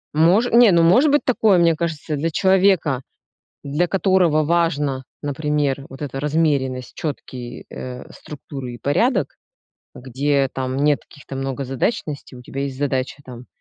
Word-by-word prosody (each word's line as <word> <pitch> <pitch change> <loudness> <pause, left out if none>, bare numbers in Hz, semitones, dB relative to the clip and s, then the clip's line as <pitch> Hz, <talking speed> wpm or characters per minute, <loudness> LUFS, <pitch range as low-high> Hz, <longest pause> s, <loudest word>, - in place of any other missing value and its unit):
Мож 175 +9 +4
не, 235 -2 +7
ну, 170 -1 +4
может 250 - +5
быть 290 - +2
такое, 220 -6 +3
мне 170 -1 +4
кажется, 155 -2 -3
для 155 +3 -1
человека, 190 -7 +3 0.6
для 150 +5 0
которого 180 -5 +2
важно, 150 -5 0 0.2
например, 145 -1 -1
вот 135 +2 -10
эта 135 -2 -4
размеренность, 140 -4 0
четкие, 125 -5 -6
э, 125 -1 -7
структуры 135 -4 -8
и - - -10
порядок, 225 - +1 0.6
где 135 +2 0
там 130 0 -3
нет 145 0 +2
каких-то 140 -1 -11
многозадачностей, 135 - -3
у - - -11
тебя 135 +1 -6
есть 135 -2 -4
задача, 135 -1 -2
там, 125 -1 -11
145 Hz, 140 wpm, -21 LUFS, 135-170 Hz, 0.6 s, не